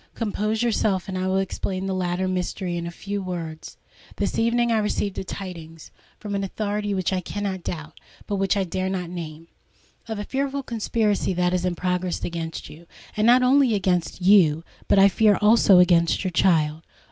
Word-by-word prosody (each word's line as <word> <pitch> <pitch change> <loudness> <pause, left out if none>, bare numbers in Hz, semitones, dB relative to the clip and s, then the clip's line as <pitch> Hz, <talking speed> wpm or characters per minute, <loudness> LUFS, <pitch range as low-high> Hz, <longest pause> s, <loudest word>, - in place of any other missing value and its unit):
Compose 215 0 -1
yourself, 210 -5 0
and 190 - -5
I 185 0 -1
will 190 0 +1
explain 190 0 -3
the 195 - -2
latter 185 0 -1
mystery 185 0 -2
in 170 0 -4
a - - -3
few 200 +3 -5
words. 170 -4 -6 0.4
This - - -2
evening 235 +1 +2
I 225 - +3
received 210 -2 -2
tidings—from 175 +3 -9
an 200 0 -1
authority 205 +1 -2
which 185 0 -1
I 185 - 0
cannot 195 -1 -4
doubt, 155 -3 -6 0.3
but 205 - -2
which 195 +1 +1
I 195 - +1
dare 185 +1 -2
not 180 -3 -4
name—of 165 +6 -10
a 205 - -3
fearful 275 +4 -2
conspiracy 215 -5 -1
that 180 0 +1
is 180 0 0
in 180 -1 -1
progress 180 0 -2
against 165 -1 -5
you,—not 215 +9 0
only 255 -2 +4
against 180 -2 -1
you, 170 -5 +5 0.2
but - - +3
I 195 0 +8
fear 210 +1 +3
also 210 -2 +5
against 175 -1 +4
your 185 - -2
child." 160 -4 +2
190 Hz, 170 wpm, -24 LUFS, 175-210 Hz, 0.4 s, I